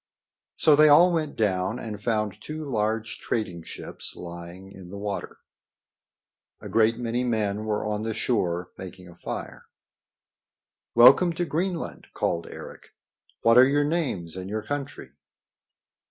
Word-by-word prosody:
So 155 - +5
they 155 +1 +7
all 175 +5 +7
went 155 -3 -1
down 95 0 0
and 105 -3 -6
found 105 -2 -1
two 155 +2 -6
large 110 -2 -1
trading 90 -7 -3
ships - - -6
lying 85 +2 -9
in 95 -2 -12
the 100 - -8
water. 100 -1 -5 1.2
A - - -9
great 110 +2 +3
many 120 +1 -1
men 110 -3 -1
were 105 0 -1
on 105 0 -2
the 110 0 -3
shore 90 -7 -1
making 90 -1 -9
a 85 - -13
fire. 85 - -7 1.3
"Welcome 135 +9 +7
to 175 +2 -1
Greenland!" 170 +2 -3
called 85 0 -1
Eric. - - -11 0.5
"What 115 +1 +6
are 130 - +8
your 145 +1 +2
names 145 - -2
and 95 0 -6
your 110 +1 -3
country?" 145 -1 -5
110 Hz, 140 wpm, -26 LUFS, 95-140 Hz, 1.3 s, are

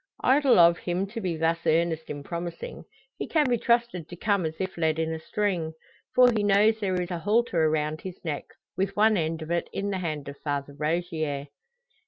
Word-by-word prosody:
Idle 270 0 +5
of 170 0 +6
him 180 +2 -1
to 230 +2 -5
be 175 -4 -2
thus 165 +1 0
earnest 160 0 +1
in 145 -1 -5
promising. 170 - -6 0.3
He - - -3
can 305 -3 +2
be 240 -2 +1
trusted 235 -9 +1
to 175 - -7
come 200 -2 +1
as 160 - -6
if 190 0 -3
led 160 -2 +1
in 160 0 -1
a 160 - -4
string. 175 -3 -1 0.4
For 250 -1 +7
he 220 -3 0
knows 205 +2 +4
there 185 -3 0
is 180 0 -3
a 175 - -2
halter 205 -4 +2
around 155 0 0
his 185 -1 -8
neck, 150 -3 -3 0.3
with 195 +1 -1
one 215 +1 +4
end 160 -2 -1
of 160 - -7
it 170 0 -1
in 200 +1 -2
the 190 - -2
hand 155 -5 -4
of 140 0 -7
Father 145 -1 -3
Rogier. 155 -2 -2
175 Hz, 210 wpm, -27 LUFS, 160-205 Hz, 0.4 s, For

